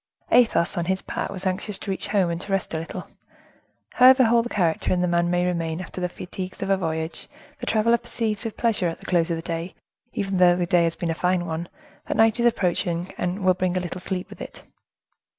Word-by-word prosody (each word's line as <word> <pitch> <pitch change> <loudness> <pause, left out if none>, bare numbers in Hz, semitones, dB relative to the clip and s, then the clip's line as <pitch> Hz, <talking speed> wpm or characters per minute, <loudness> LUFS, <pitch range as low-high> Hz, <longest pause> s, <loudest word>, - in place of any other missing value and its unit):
Athos, 230 -9 +4
on 170 - -1
his 190 +1 -1
part, - - -3
was 190 -1 -7
anxious 190 +2 -1
to 195 - -5
reach 190 - -1
home 190 -5 +2
and 170 +1 -4
to 200 - -7
rest 195 -3 -1
a 160 - -1
little. 165 - -7 0.9
However 255 +1 +7
whole 235 0 +4
the 240 - -5
character 170 -7 0
and 180 -1 +2
the - - +2
man 175 0 +1
may 175 0 +1
remain 165 -2 -1
after 185 0 -7
the 180 - 0
fatigues 185 +2 -7
of 195 - -1
a - - +5
voyage, 160 -2 -3 0.3
the - - -6
traveler 230 +2 +3
perceives 225 -3 -3
with 225 - -5
pleasure, 220 -6 +1
at 165 - -3
the - - -15
close 170 -2 +1
of 170 - 0
the 165 - -6
day—even 190 +5 -5
though 180 -1 +6
the 175 0 0
day 170 0 +3
has 165 - -1
been 170 -1 -2
a - - 0
fine 180 +1 0
one—that 170 - -6
night 225 +1 +4
is 240 - +4
approaching, 175 -4 0
and 185 +2 -2
will 185 - +6
bring 185 0 -1
a - - +2
little 180 0 -5
sleep 185 -1 -3
with - - -11
it. - - -9
185 Hz, 230 wpm, -24 LUFS, 170-205 Hz, 0.9 s, However